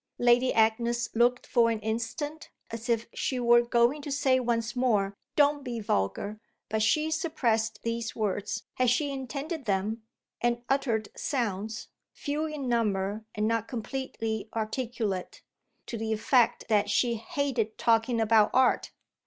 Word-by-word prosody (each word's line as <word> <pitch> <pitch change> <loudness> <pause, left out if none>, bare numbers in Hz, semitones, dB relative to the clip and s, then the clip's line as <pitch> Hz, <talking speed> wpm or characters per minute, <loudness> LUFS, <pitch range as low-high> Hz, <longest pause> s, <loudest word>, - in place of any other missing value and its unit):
Lady 245 +1 +4
Agnes 235 +2 +2
looked 245 +2 +3
for 235 -2 +3
an 225 -1 -1
instant 235 +8 -4 0.2
as 230 +2 -6
if 230 -1 +1
she 255 - -2
were 240 0 +6
going 240 +4 +2
to 285 - -6
say 270 -2 +3
once 235 -1 -1
more 215 -6 +1 0.2
"Don't 290 -1 +3
be 240 -3 -4
vulgar!" 200 - -1 0.3
But 220 0 0
she 305 +8 +2
suppressed 235 -9 0
these 230 0 -3
words, 210 0 -2
had 255 -1 +3
she 280 +4 +1
intended 275 +3 -5
them, 210 +2 -1 0.4
and 240 0 0
uttered 240 -6 0
sounds, 220 -4 -3 0.2
few 300 +2 -2
in 300 -4 -5
number 210 -3 0
and 210 0 0
not 230 0 0
completely 225 -3 -4
articulate, 220 -4 -3 0.4
to 230 - -5
the 220 0 -2
effect 235 +2 +2
that 205 -2 +2
she 235 +3 +2
hated 255 -4 -2
talking 230 +1 +2
about 220 -1 +4
art. 260 0 +3
235 Hz, 145 wpm, -28 LUFS, 220-260 Hz, 0.4 s, were